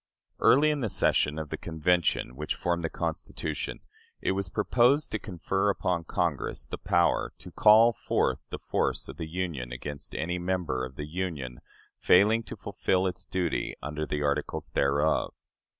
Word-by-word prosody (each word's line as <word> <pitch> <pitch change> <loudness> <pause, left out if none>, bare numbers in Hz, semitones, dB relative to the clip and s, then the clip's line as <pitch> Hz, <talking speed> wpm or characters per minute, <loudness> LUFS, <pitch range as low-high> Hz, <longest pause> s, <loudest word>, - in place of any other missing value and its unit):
Early 150 +3 +5
in 150 - -1
the 115 -5 -1
session 75 -5 +2
of 80 -1 -4
the - - -4
Convention 80 -5 0
which 75 +3 -3
formed 85 -1 -1
the 80 - 0
Constitution, 80 -2 -4 0.4
it - - 0
was 95 -1 -1
proposed 125 - +3
to 110 - -1
confer 95 +2 -1
upon 90 -4 0
Congress 85 -4 -2
the - - -7
power - - +2
"to - - -11
call 110 +2 +6
forth - - 0
the - - -4
force - - -1
of - - -9
the 80 -2 -5
Union 80 -8 -3
against 70 +3 -7
any 90 +2 -2
member 90 -8 -1
of 65 +1 -11
the 75 - -5
Union 75 -8 -4 0.4
failing 105 +5 +5
to - - -7
fulfill 95 -2 0
its 90 -2 -3
duty 90 -3 -1
under 75 +2 -3
the 75 0 -2
articles 70 +1 -1
thereof." 70 +3 +1
85 Hz, 165 wpm, -28 LUFS, 75-95 Hz, 0.4 s, call